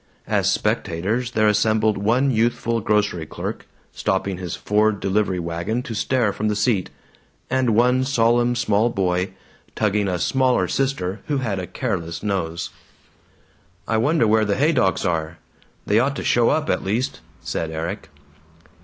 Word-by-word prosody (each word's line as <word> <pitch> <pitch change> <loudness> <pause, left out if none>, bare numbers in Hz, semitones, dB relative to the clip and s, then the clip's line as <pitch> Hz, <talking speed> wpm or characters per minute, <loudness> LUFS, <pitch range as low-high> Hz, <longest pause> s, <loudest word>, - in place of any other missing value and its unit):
As - - +1
spectators 105 +9 -1
there 110 -1 +3
assembled 110 0 +2
one 120 +7 +2
youthful 115 0 +1
grocery 105 -6 0
clerk, - - -6 0.2
stopping 95 -1 -1
his 90 -2 -4
Ford 105 0 +1
delivery 95 -1 0
wagon 85 +8 -2
to 115 - -6
stare 115 -1 +1
from 110 - -2
the 105 - 0
seat, 100 -2 +1 0.6
and 130 -4 +2
one 125 +3 +3
solemn 120 -2 +2
small 115 -1 +2
boy, 95 -3 0 0.5
tugging 105 -1 +1
a 90 -2 0
smaller 125 -1 +2
sister 120 -8 -1
who 145 -2 0
had 110 -8 -2
a 90 - -5
careless 90 -10 -3
nose. 90 -5 -2 1.2
"I 110 - +1
wonder 145 +3 +2
where 110 0 +3
the 100 -1 0
Haydocks 135 - +2
are? 85 -1 -1 0.5
They 105 +2 +3
ought 140 +4 +1
to - - -4
show 120 -1 +3
up, 155 -1 +1
at - - 0
least," 110 +7 -1 0.2
said 80 - -3
Erik. 85 +6 -5
105 Hz, 150 wpm, -22 LUFS, 95-120 Hz, 1.2 s, there